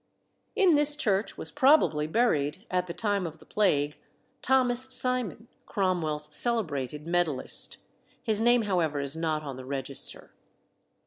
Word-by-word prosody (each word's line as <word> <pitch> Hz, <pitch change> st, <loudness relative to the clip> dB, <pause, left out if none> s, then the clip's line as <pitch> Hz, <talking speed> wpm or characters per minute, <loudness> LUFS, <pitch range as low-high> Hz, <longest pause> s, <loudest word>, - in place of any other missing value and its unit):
In 380 Hz, -6 st, +4 dB
this 295 Hz, 0 st, +5 dB
church 210 Hz, -7 st, -1 dB
was -, -, -5 dB
probably 265 Hz, -, +3 dB
buried, 160 Hz, -4 st, 0 dB
at 180 Hz, 0 st, 0 dB
the -, -, -5 dB
time 205 Hz, -4 st, -1 dB
of 160 Hz, -, -10 dB
the -, -, -19 dB
Plague, 150 Hz, -8 st, 0 dB, 0.4 s
Thomas 255 Hz, -1 st, +3 dB
Simon, 250 Hz, -3 st, 0 dB, 0.2 s
Cromwell's 155 Hz, -6 st, -1 dB
celebrated 150 Hz, -, -2 dB
medallist. 170 Hz, -5 st, 0 dB, 0.5 s
His 215 Hz, -1 st, 0 dB
name, 240 Hz, 0 st, +4 dB
however, 170 Hz, -8 st, 0 dB
is 140 Hz, +1 st, -4 dB
not 160 Hz, -2 st, -2 dB
on 135 Hz, -3 st, -7 dB
the 130 Hz, -, -9 dB
register. 135 Hz, 0 st, -4 dB
180 Hz, 135 wpm, -27 LUFS, 150-235 Hz, 0.5 s, this